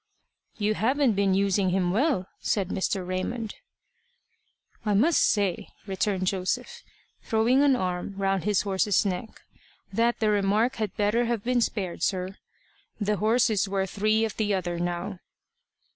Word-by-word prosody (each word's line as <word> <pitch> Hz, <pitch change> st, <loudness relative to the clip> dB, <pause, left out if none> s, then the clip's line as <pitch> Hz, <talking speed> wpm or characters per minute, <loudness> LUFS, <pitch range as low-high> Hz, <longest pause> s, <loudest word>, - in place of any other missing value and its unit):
"You 210 Hz, 0 st, +1 dB
haven't 255 Hz, +3 st, +2 dB
been 195 Hz, -1 st, +2 dB
using 195 Hz, -1 st, +2 dB
him 180 Hz, -1 st, +1 dB
well," 240 Hz, -, +1 dB
said 195 Hz, -3 st, -1 dB
Mr. 190 Hz, -1 st, -1 dB
Raymond. 205 Hz, +5 st, -3 dB, 1.3 s
"I 210 Hz, -2 st, +1 dB
must 295 Hz, +11 st, +4 dB
say," 200 Hz, -5 st, +1 dB, 0.2 s
returned 195 Hz, -1 st, -1 dB
Joseph, 185 Hz, 0 st, -2 dB, 0.4 s
throwing 230 Hz, +4 st, +2 dB
an 285 Hz, -2 st, +5 dB
arm 185 Hz, -2 st, -3 dB
round 195 Hz, -2 st, 0 dB
his 205 Hz, -2 st, +1 dB
horse's 200 Hz, +1 st, +1 dB
neck, 195 Hz, +3 st, -4 dB, 0.5 s
"that 235 Hz, +3 st, +1 dB
the 215 Hz, -1 st, +2 dB
remark 210 Hz, +5 st, +1 dB
had 215 Hz, -4 st, -3 dB
better 215 Hz, +4 st, +2 dB
have 230 Hz, -3 st, -1 dB
been 245 Hz, 0 st, +1 dB
spared, 190 Hz, -7 st, -2 dB
sir. 185 Hz, +1 st, -1 dB, 0.6 s
The 210 Hz, 0 st, 0 dB
horse 225 Hz, +3 st, +3 dB
is 205 Hz, -1 st, +1 dB
worth 195 Hz, -1 st, -1 dB
three 215 Hz, +2 st, +2 dB
of 220 Hz, -, -6 dB
the 210 Hz, -2 st, +1 dB
other 175 Hz, -2 st, -3 dB
now." 175 Hz, +2 st, -3 dB
205 Hz, 145 wpm, -26 LUFS, 190-220 Hz, 1.3 s, an